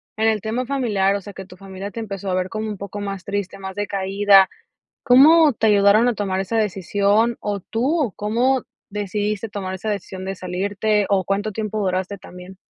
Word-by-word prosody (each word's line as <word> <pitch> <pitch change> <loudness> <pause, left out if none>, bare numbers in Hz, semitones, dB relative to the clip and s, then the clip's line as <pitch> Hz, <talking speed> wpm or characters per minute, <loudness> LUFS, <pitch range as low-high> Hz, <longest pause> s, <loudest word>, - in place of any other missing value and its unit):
en 220 +1 +2
el 220 -1 +1
tema 225 +5 -3
familiar, 220 -8 +1
o - - -1
sea, 200 +1 -10
que 190 - -8
tu 180 0 -15
familia 195 +1 -8
te 230 - -7
empezó 195 -3 -5
a - - 0
ver 185 0 0
como 215 +2 -4
un 210 - -5
poco 200 +1 -7
más 195 -2 -5
triste, 200 -2 -4
más 190 -1 -7
decaída. 200 -1 +3 0.6
¿Cómo 290 +3 +6
te 220 0 +1
ayudaron 205 +3 +5
a 245 - +3
tomar 195 -3 -2
esa 200 +4 -1
decisión? 205 +2 +1
¿O 205 -1 -3
tú 250 - -1
o 245 - 0
cómo 245 +5 0 0.3
decidiste 210 +1 -2
tomar 200 -3 -5
esa 190 +4 -5
decisión 190 -2 -4
de 195 - -3
salirte, 200 +3 -1
o, 195 -2 +2
cuánto 200 +3 -1
tiempo 215 0 -4
duraste 190 +1 -2
también? 180 +1 -12
205 Hz, 200 wpm, -21 LUFS, 195-220 Hz, 0.6 s, Cómo